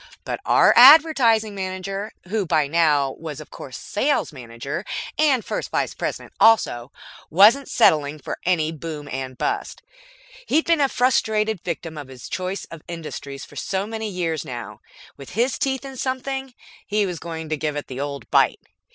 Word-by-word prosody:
But - - -4
our - - +6
Advertising 250 -6 +7
Manager, 195 +2 -4 0.2
who 210 +2 0
by 155 -3 +2
now 145 -3 +2
was 155 -3 -6
of 155 - -11
course 130 -3 -9
Sales 270 - -1
Manager 130 - -6 0.4
and 280 -6 +3
First - - -3
Vice - - -1
President - - -5
also, 140 - +4 0.4
wasn't 215 - +5
settling 150 -1 +3
for 145 - -6
any 165 -3 +1
boom 155 -2 -7
and 130 -1 -5
bust. - - -3 0.6
He'd 315 +2 +2
been 335 -3 +3
a 275 - +3
frustrated 220 -6 +1
victim 165 -2 -5
of 145 - -8
his 130 -2 -11
choice 185 +1 -3
of 165 -2 -9
industries 150 -5 -7
for - - -17
so 190 0 -2
many 220 0 -4
years 170 -5 -2
that - - -10
now, 120 -2 -7 0.4
with 140 +3 -11
his 240 +6 0
teeth 265 0 -1
in 270 -1 -8
something, 265 0 -3 0.3
he 210 0 +1
was 180 -4 -4
going 160 -1 -6
to 155 - 0
give 150 0 -3
it 145 - -4
the 130 0 -7
old 140 -4 -5
bite. - - +3
180 Hz, 170 wpm, -22 LUFS, 150-225 Hz, 0.6 s, Advertising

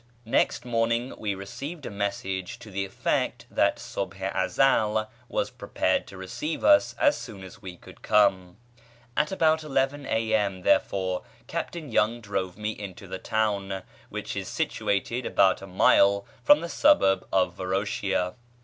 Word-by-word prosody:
Next 115 - +1
morning 115 +1 0
we 100 -2 -2
received 140 - -7
a - - -5
message 95 -2 -3
to 105 - -12
the 95 0 -2
effect 95 - -1
that - - +3
Subh 95 -1 -5
i 95 0 -3 0.2
Ezel 110 -5 +2 0.2
was - - -1
prepared - - -1
to 95 - -11
receive 120 - -4
us 300 0 +5
as 290 -1 +4
soon 105 -7 -8
as 95 0 -12
we 90 -3 -8
could - - -15
come. 95 -4 +2 0.6
At 150 0 +1
about 160 -4 +2
11 135 -1 0
a.m., 110 -4 0
therefore, 95 -1 +2 0.2
Captain 160 -6 -5
Young 115 +2 +2
drove 95 -4 -3
me 105 0 -2
into 100 -3 -8
the 95 +1 -5
town, 100 -3 -1 0.3
which - - -5
is - - -4
situated 115 +5 -1
about 95 -1 +3
a 95 - -8
mile 100 +1 +4 0.2
from 295 0 +6
the - - -3
suburb 95 - +4
of 90 -2 +2
Varoshia. 95 -1 -1
100 Hz, 150 wpm, -27 LUFS, 95-120 Hz, 0.6 s, from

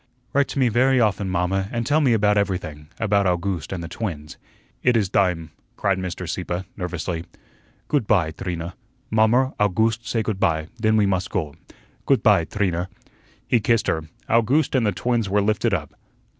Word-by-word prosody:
"Write 140 0 +3
to - - -6
me 130 -2 +4
very 130 +3 +3
often, 100 -4 +1
mamma, 95 +2 0
and 115 -1 -2
tell 150 +5 +3
me 130 -5 +4
about 105 -1 +3
everything 90 -7 -2
about 100 -3 +2
August 90 -2 -1
and 90 -3 -4
the - - -5
twins." 80 -5 -5 0.5
"It 125 -2 +3
is 100 -4 +1
dime," 90 -6 +1 0.3
cried 95 -2 +1
Mr. 90 -1 -5
Sieppe, 90 +1 -3
nervously. 90 -2 -4 0.6
"Goot 145 -8 0
py, 90 -7 +2
Trina. 85 0 -5 0.4
Mommer, 115 +4 +3
Owgooste, 110 +3 +1
say 115 0 0
goot 105 -2 -3
py, 80 -4 +1
den 110 0 +3
we 105 - +4
must 95 -2 0
go. 75 -7 -2 0.5
Goot - - +3
py, 85 - +5
Trina." 90 -3 -1 0.6
He 120 - +3
kissed 115 +1 +2
her. 80 -1 -1 0.2
Owgooste 125 +7 +2
and 125 -5 +2
the - - +2
twins 115 +3 -1
were 105 +2 +2
lifted 110 +3 +1
up. 80 -7 -2
100 Hz, 175 wpm, -23 LUFS, 90-115 Hz, 0.6 s, py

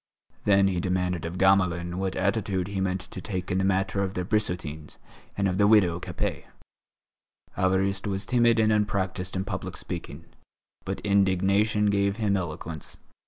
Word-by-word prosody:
Then 100 -1 +5
he 90 -2 -1
demanded 90 -2 -1
of 85 +2 -5
Gamelin 90 -2 +2
what 95 -1 -2
attitude 95 -1 0
he 100 -1 -2
meant 95 0 -1
to 95 - -9
take 95 -3 -4
up - - -7
in 90 - +1
the - - +1
matter 95 +1 +1
of 95 0 -2
the 90 - -2
Brissotins 90 -8 -2 0.4
and 100 -1 +2
of 95 +1 -1
the 100 - +5
widow 95 -6 +4
Capet. - - -4 1.1
Évariste 95 +2 +1
was 100 0 -2
timid 120 -1 +3
and 110 -1 +3
unpractised 95 -3 -1
in 95 - -1
public - - -5
speaking. 80 +4 -7 0.6
But - - -4
indignation 100 +2 +2
gave 100 0 +1
him 105 -3 +1
eloquence. 85 -3 -5
95 Hz, 165 wpm, -26 LUFS, 90-100 Hz, 1.1 s, Then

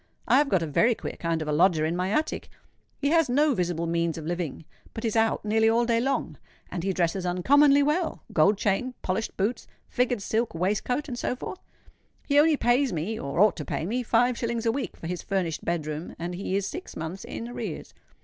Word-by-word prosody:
I 260 - +5
have 290 -1 +2
got 190 -5 +2
a - - -1
very 225 - +3
queer - - -6
kind 165 -2 -1
of - - -9
a - - 0
lodger 160 0 +3
in 165 +2 -1
my 180 +1 -1
attic: 305 +9 -1 0.5
he 280 - 0
has 325 -3 +3
no 290 +3 +3
visible 175 -5 -1
means 170 0 0
of 160 - -6
living, 170 -2 -4 0.3
but 225 - -4
is 225 - -1
out 225 -1 +2
nearly 220 +1 +3
all 235 +1 +3
day 230 -1 +2
long; 270 +2 -1 0.3
and 175 - -3
he 195 - +1
dresses 180 +1 0
uncommonly 280 +11 +4
well—gold 285 - +1
chain—polished 210 0 -2
boots—figured 240 +2 -2
silk 225 -2 -1
waistcoat—and 240 - -1
so - - -1
forth. 355 - -7 0.7
He 285 0 +4
only 305 0 +5
pays 250 +2 +2
me—or 165 -3 -3
ought 210 +1 +5
to 155 - -4
pay 145 - -3
me—five 245 +2 +1
shillings 235 -1 -2
a 225 - +3
week 275 +3 -4
for - - -10
his 175 +1 -3
furnished 185 -5 -2
bed 170 -3 -1
room; 155 +2 -5
and 175 +1 -4
he 185 +1 -3
is 200 -1 0
six 365 - -7
months 160 +4 -5
in 230 - -6
arrears. 245 - -6
210 Hz, 200 wpm, -26 LUFS, 170-245 Hz, 0.7 s, I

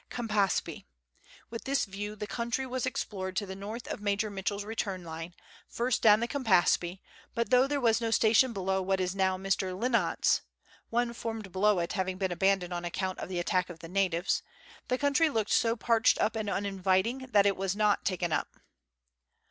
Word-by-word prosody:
Campaspe. 205 - -1 0.6
With 230 - -6
this 275 0 +1
view 205 +1 -6
the 210 - -5
country 235 +4 -2
was 255 0 -2
explored 190 -7 -4
to 205 - -1
the 190 0 -7
north 210 +5 -7
of - - -5
Major 205 +1 0
Mitchell's 200 +1 -3
return 205 -4 -3
line, 165 +1 -7 0.3
first 245 +1 -1
down 215 -1 +6
the 235 - 0
Campaspe; 190 -8 +2 0.3
but 235 +1 -1
though 255 +1 +5
there 285 0 -1
was 230 -2 +2
no 230 - 0
station 225 +3 +4
below 190 -2 -1
what 190 +1 0
is 180 0 -1
now 190 -1 +1
Mr. 190 -1 -1
Lynott's 235 +1 +2 0.5
(one 235 0 0
formed 225 -4 -5
below 200 +2 +3
it 170 -1 -1
having 190 -1 -2
been 190 -1 -1
abandoned 190 0 +1
on 175 0 -3
account 185 +2 -3
of - - -6
the 185 - -3
attack 180 +1 0
of 175 - -8
the 165 - -10
natives), 185 -1 0 0.5
the 255 - 0
country 285 +4 +3
looked 220 -6 -1
so 230 -1 +3
parched 230 -1 +3
up 220 - +1
and 215 -2 -2
uninviting 200 +6 0
that 205 -4 +4
it 200 -1 +3
was 190 0 -2
not 210 -1 +2
taken 175 -3 -1
up. - - -2
200 Hz, 190 wpm, -30 LUFS, 185-230 Hz, 0.6 s, down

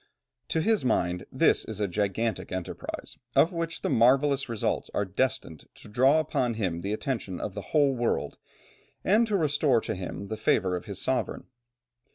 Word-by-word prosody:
To 160 - 0
his 220 +3 +2
mind, 90 -8 0
this - - +3
is 110 -2 -7
a 105 - +1
gigantic 105 +4 -1
enterprise 95 -1 -6 0.2
of 170 - +5
which 165 -1 -3
the - - 0
marvellous 135 +3 +3
results 115 -3 -1
are 100 - +1
destined 95 - -2
to - - -13
draw 130 +8 +4
upon 125 -6 0
him 90 -6 -2
the 100 - -3
attention 110 -5 -3
of 100 - -4
the - - -5
whole 145 -3 +3
world, 120 -1 -1 0.6
and 220 +4 +4
to 210 -2 +1
restore 145 -6 +2
to - - -3
him 95 +2 -6
the 110 - -3
favour 95 -4 +2
of 90 - -5
his 100 -3 -6
sovereign. 130 0 -1
115 Hz, 175 wpm, -28 LUFS, 100-145 Hz, 0.6 s, of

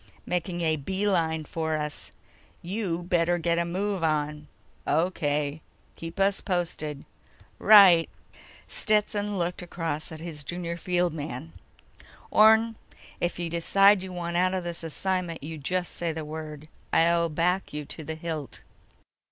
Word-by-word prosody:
"Making 175 0 -2
a 160 -1 +1
beeline 170 -1 0
for 160 0 -2
us. 150 -1 -5 0.5
You 175 -2 -2
better 175 0 +2
get 170 0 +1
a 170 - +1
move 190 +1 -2
on." 150 -1 -1 0.4
"O.K. 150 -2 0 0.3
Keep 165 +3 -8
us 195 0 +2
posted." 165 -6 -3 0.5
"Right." 195 -6 +8 0.6
Stetson 210 -1 +1
looked 175 0 -2
across 165 -3 -4
at 160 - -8
his 160 -3 -6
junior 170 +2 -4
field 175 -1 0
man. 130 - -6 0.8
"Orne, 220 +1 +5 0.4
if 175 0 -1
you 175 -1 -2
decide 195 +4 +4
you 190 0 -7
want 170 -1 -3
out 185 +1 +2
of 185 - -2
this 170 -1 -5
assignment, 175 0 -2
you 160 +1 -6
just 180 +5 -2
say 170 -1 -1
the 160 -1 -5
word. 155 -1 -7 0.2
I'll 170 0 +3
back 175 +4 0
you 150 0 -5
to 160 - -8
the 160 +1 -5
hilt." 160 -3 -5
170 Hz, 140 wpm, -27 LUFS, 155-185 Hz, 0.8 s, Right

